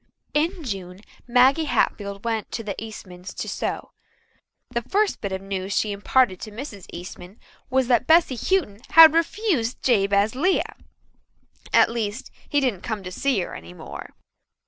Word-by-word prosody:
In 330 +4 0
June 190 -6 -6 0.3
Maggie 260 +6 +4
Hatfield 200 -7 -1
went 225 -2 -2
to 230 - -3
the 205 -2 -3
Eastmans' 190 -4 -9
to - - -4
sew. - - -4 0.8
The 235 - -1
first 400 - 0
bit 200 - -3
of 190 0 -4
news 195 0 -3
she 210 - +1
imparted 200 0 +1
to - - -6
Mrs. 210 - -8
Eastman 180 +3 -10 0.3
was 260 0 +2
that 245 -1 +2
Bessy 325 -5 +5
Houghton 245 - 0
had 325 -1 +9
refused 330 - 0
Jabez 200 -3 +3
Lea 360 +9 +2 1.1
at - - +5
least, 230 +2 -4 0.2
he 290 - +2
didn't 245 -10 -1
come 220 -4 -4
to 185 - -7
see 255 +1 0
her - - -6
any 85 +2 -10
more. - - -9
225 Hz, 155 wpm, -24 LUFS, 195-275 Hz, 1.1 s, had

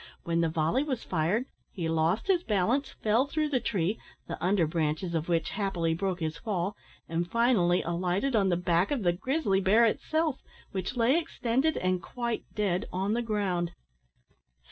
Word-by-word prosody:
When 170 0 +1
the 165 - +2
volley 160 +10 +1
was 275 -5 -2
fired, 180 +8 0 0.3
he 170 -4 -3
lost 165 +6 +1
his 375 -3 +3
balance, 235 - +1
fell 225 +6 +1
through 305 +1 -1
the 265 -3 +1
tree, 200 -1 -1 0.3
the - - -6
under 185 -1 +3
branches 160 +2 -1
of 165 +1 -2
which 165 -2 +1
happily 180 -5 0
broke 185 +1 -2
his 160 0 -2
fall, 195 -1 -2 0.3
and 170 +1 -2
finally 225 -7 +3
alighted 180 +9 0
on 195 -3 +3
the 175 - +2
back 175 +1 +2
of 275 -7 -1
the 175 -1 +3
grizzly 205 - 0
bear 215 +5 +5
itself, 310 +5 0 0.3
which 190 +5 -3
lay 250 +7 +4
extended, 295 -2 0
and 185 -1 0
quite 235 +2 -3
dead, 200 -1 0
on 190 +3 0
the 240 - +1
ground. 190 -6 -1
195 Hz, 170 wpm, -29 LUFS, 170-235 Hz, 0.3 s, bear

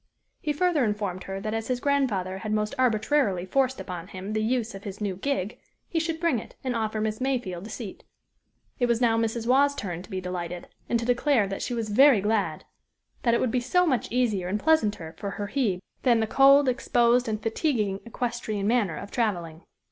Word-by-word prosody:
He 300 - -1
further 320 -1 +2
informed 205 -4 -2
her 195 0 -4
that 215 +2 -3
as 225 0 -2
his 255 -1 -1
grandfather 220 -10 0
had 215 +1 -4
most 210 +1 0
arbitrarily 220 -5 +2
forced 265 +5 +1
upon 180 -2 -6
him 195 +2 -6
the 215 - 0
use 235 0 0
of 195 0 -9
his 200 -1 -7
new 200 -3 -2
gig, 210 -1 -2 0.3
he 330 - -1
should 325 0 -2
bring 330 -8 +1
it, - - -12
and 255 -2 -1
offer 220 -1 -1
Miss 215 +2 -2
Mayfield 225 -9 -2
a - - -10
seat. 220 -6 -7 0.8
It 245 - +3
was 235 -1 +2
now 235 -2 +3
Mrs. 225 0 -1
Waugh's 280 +3 +4
turn 180 -10 -4
to 185 - -14
be 190 -3 -3
delighted, 180 -1 -5 0.2
and 235 - +2
to 230 - -3
declare 245 -1 +3
that 195 0 -5
she 245 - -2
was 225 -2 -3
very 260 +2 +6
glad 210 +1 -1 0.6
that 235 -1 +3
it - - +2
would 250 - 0
be 250 - +1
so 360 +9 +2
much 260 -9 0
easier 220 -7 +1
and 200 +3 -1
pleasanter 210 - +1
to 200 - -3
her 205 0 -5
Hebe, 210 -8 0 0.2
than 240 -3 +4
the 220 - +2
cold, 275 +4 +6
exposed, 245 -1 +2
and 215 -1 -1
fatiguing 225 - 0
equestrian 235 -3 -3
manner 210 -7 +1
of 200 - -8
traveling. 175 -9 -2
225 Hz, 210 wpm, -26 LUFS, 200-255 Hz, 0.8 s, very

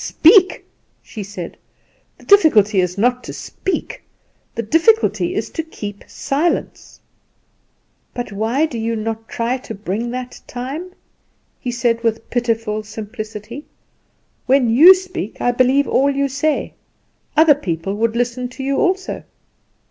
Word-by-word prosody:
speak!" 375 +3 +4 0.4
she 220 - -8
said, 190 -3 -7 0.6
"the - - -18
difficulty 220 - +5
is 180 +1 -2
not 245 +4 +1
to - - -7
speak; 380 - -4 0.5
the 230 - -2
difficulty 225 - +2
is 220 - -3
to - - -2
keep 205 -11 -8
silence." 305 +5 -2 1.2
"But 245 -3 -4
why 225 +9 0
do 245 -7 -5
you 230 +1 -1
not 225 +1 -4
try 240 +2 -1
to 225 - -8
bring 210 +4 -3
that 250 0 -6
time?" 275 +9 -6 0.7
he 250 - -4
said 235 -1 0
with 225 -1 -2
pitiful 225 -3 -1
simplicity. 215 +3 -8 0.8
"When 255 -3 +3
you 325 +11 +9
speak 365 - -6
I 245 - +2
believe 255 +3 +3
all 275 +2 +2
you 280 0 0
say; 285 +3 -1 0.6
other 315 -1 +7
people 190 - -3
would 230 +1 0
listen 245 +1 -1
to 260 +2 -8
you 275 +1 0
also." 375 0 0
245 Hz, 135 wpm, -19 LUFS, 215-280 Hz, 1.2 s, you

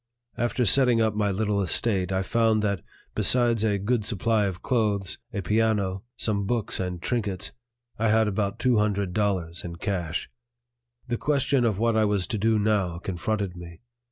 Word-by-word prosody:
After 120 +1 0
settling 125 +2 +4
up 110 -2 +2
my 105 -1 0
little 100 +1 0
estate 95 0 +2
I 95 0 0
found 110 +1 +2
that, 100 -4 0 0.3
besides 120 -3 +3
a 105 -2 +2
good 110 +3 0
supply 110 0 +1
of 90 -3 -6
clothes, 105 -6 0
a 100 - -4
piano, 105 -2 +1 0.2
some 100 -3 -1
books 115 -2 -1
and 90 -2 -3
trinkets, 100 -3 -2 0.5
I 115 0 +2
had 110 0 +3
about 100 0 -1
two 125 -4 +2
hundred 100 -3 0
dollars 95 -5 -1
in 85 -1 -6
cash. 90 -2 -3 0.8
The 120 -1 -1
question 140 -3 +1
of 110 -4 +1
what 115 +1 +1
I 110 -1 +3
was 100 -3 +1
to 110 -4 -2
do 110 +2 +2
now 100 -5 +1
confronted 95 +2 -3
me. 85 -1 -11
105 Hz, 170 wpm, -26 LUFS, 95-115 Hz, 0.8 s, settling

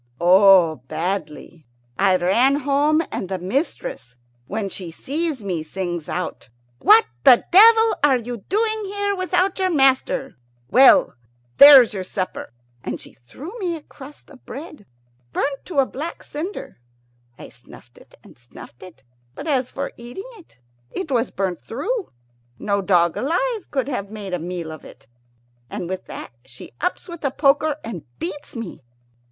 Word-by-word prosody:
"Oh, 180 -2 +6
badly. 160 -1 -5 0.3
I 195 -1 +4
ran 215 +10 +3
home, 290 +3 +2
and 185 - -4
the 190 - -2
mistress, 180 - -4 0.3
when 210 -1 -3
she 185 -2 -7
sees 285 - -3
me, 180 -5 -3
sings 175 0 -5
out, 180 -10 -5 0.3
'What 440 +2 +6 0.2
the 255 -4 +6
devil 445 +4 +7
are 275 -3 +5
you 240 0 -6
doing 435 +1 0
here 405 0 -2
without 370 +1 0
your 375 -1 +1
master? 270 -3 +1 0.3
Well, 270 +2 +6 0.4
there's 275 -5 +9
your 190 -2 -4
supper;' 185 - -5 0.3
and - - -4
she - - -12
threw 285 - -11
me 355 -4 -2
a 310 - -10
crust 285 +1 -14
of 265 - -17
bread, 290 - -10 0.5
burnt 275 -1 -2
to 345 - -7
a 275 - +5
black 305 +6 -7
cinder. 330 - -7 0.6
I - - -11
snuffed - - -17
it - - -20
and - - -18
snuffed 120 0 -14
it, 175 -8 -14 0.3
but - - -8
as 265 -5 0
for 280 +1 -5
eating 245 +11 -9
it, 410 - -18 0.3
it 350 -6 -6
was 245 -1 +1
burnt 185 -3 -3
through. 390 - -4 0.5
No 200 -1 -1
dog 175 -3 +2
alive 420 - -1
could 265 -2 -2
have 205 -8 -4
made 205 -3 -7
a 180 - -1
meal 170 -1 -5
of 155 - -10
it. - - -15 0.6
And 175 - -5
with 185 +1 -5
that - - -8
she 130 -1 -13
ups - - -2
with 345 -3 -9
a 275 - +1
poker 290 +2 +2
and 200 -8 -7
beats 190 - -7
me. 230 -6 -7
255 Hz, 160 wpm, -21 LUFS, -, 0.6 s, there's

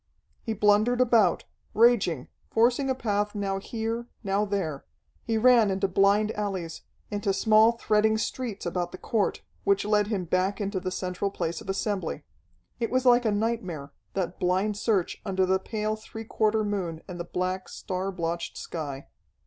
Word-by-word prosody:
He 225 - -3
blundered 210 +4 +3
about, 235 -4 +4 0.3
raging, 210 - +3 0.2
forcing 245 +4 +2
a 260 - +1
path 205 -4 -1
now 195 -1 -1
here, 230 +3 -3 0.2
now 200 +1 +1
there. 185 -9 -2 0.4
He 225 -1 -1
ran 235 -2 +5
into 195 +1 +1
blind 200 +3 +3
alleys, 190 -6 -4 0.3
into 205 -1 0
small 220 +3 +5
threading 220 -1 +2
streets 225 -2 -3
about 175 0 -2
the - - -8
court, 210 0 -1 0.2
which 200 0 +2
led 210 -1 +2
him 200 -4 -2
back 185 +5 0
into 200 -2 -2
the 185 0 -3
central 185 +1 -2
place 165 -4 -3
of - - -11
assembly. 195 0 -2 0.6
It 230 - -1
was 255 +1 +1
like 245 -1 +5
a 220 - +3
nightmare, 205 -10 -2 0.2
that 185 -2 -2
blind 190 +4 +1
search 205 -4 0
under 190 -2 +1
the 190 +1 +2
pale 215 0 -2
three 225 +1 -9
quarter 215 0 +1
moon 185 -6 -3
and 180 -1 -7
the - - -2
black, 185 +2 -3
star 190 +1 -3
blotched 170 -1 -3
sky. 145 -5 -5
205 Hz, 165 wpm, -27 LUFS, 185-220 Hz, 0.6 s, ran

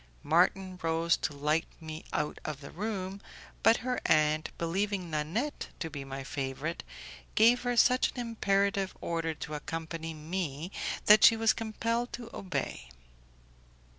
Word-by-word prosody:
Marton 180 +4 +2
rose 165 +1 +2
to - - -2
light 150 +3 +1
me 160 -1 -7
out 150 0 -1
of 150 -3 -4
the 140 - -10
room, 195 0 -4 0.4
but 225 +1 +6
her 250 -1 -1
aunt, 155 0 +3
believing 185 +1 -1
Nanette 170 - -2
to 160 -2 -4
be 145 -2 -5
my 135 0 -6
favourite, 140 +3 -3 0.5
gave 235 +3 +6
her 245 -1 -1
such 250 +2 +5
an - - -11
imperative 200 -4 0
order 165 -1 -2
to 150 - -6
accompany 165 +1 -5
me 160 0 -4 0.3
that 210 +1 +8
she 225 - +8
was 225 0 +4
compelled 230 +2 -2
to 235 -1 -7
obey. 180 - -3
170 Hz, 140 wpm, -30 LUFS, 155-210 Hz, 0.5 s, that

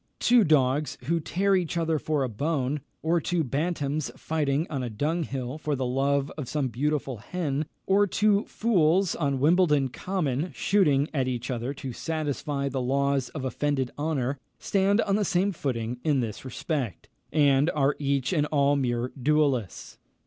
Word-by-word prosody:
Two 240 -2 +5
dogs 145 -2 +2
who 165 +6 0
tear 195 +5 +1
each 175 -2 -1
other 165 -2 +1
for 150 -2 0
a - - 0
bone, 140 +3 -1 0.2
or 165 +1 +2
two 175 +1 0
bantams 145 +1 -1
fighting 150 -1 0
on 140 -4 -3
a 125 - -3
dunghill 140 +1 -2
for 150 -1 -1
the 130 -1 -2
love 140 +2 +1
of 130 - -5
some 145 -4 -1
beautiful 140 0 -1
hen, 150 - -3 0.2
or 200 +1 +4
two 205 +1 +2
fools 185 -4 +2
on 140 -4 0
Wimbledon 150 -3 +3
Common, 160 0 -2
shooting 150 -8 +2
at 135 -4 0
each 125 0 -3
other 120 +2 -2
to 135 -2 -6
satisfy 145 -2 -2
the 135 -1 -2
laws 135 +1 +1
of 140 -4 -6
offended 135 -1 -1
honour, 145 -3 -1 0.2
stand 200 +2 +2
on 200 -2 +1
the 210 - +1
same 190 +1 +1
footing 125 - -3
in 150 -4 +2
this 110 -4 -4
respect, 130 - -3 0.2
and 145 0 +4
are 140 -1 +2
each 140 0 0
and 150 -3 +2
all 145 -1 +3
mere 125 -2 -1
duellists. 140 - 0
145 Hz, 165 wpm, -27 LUFS, 135-160 Hz, 0.2 s, Two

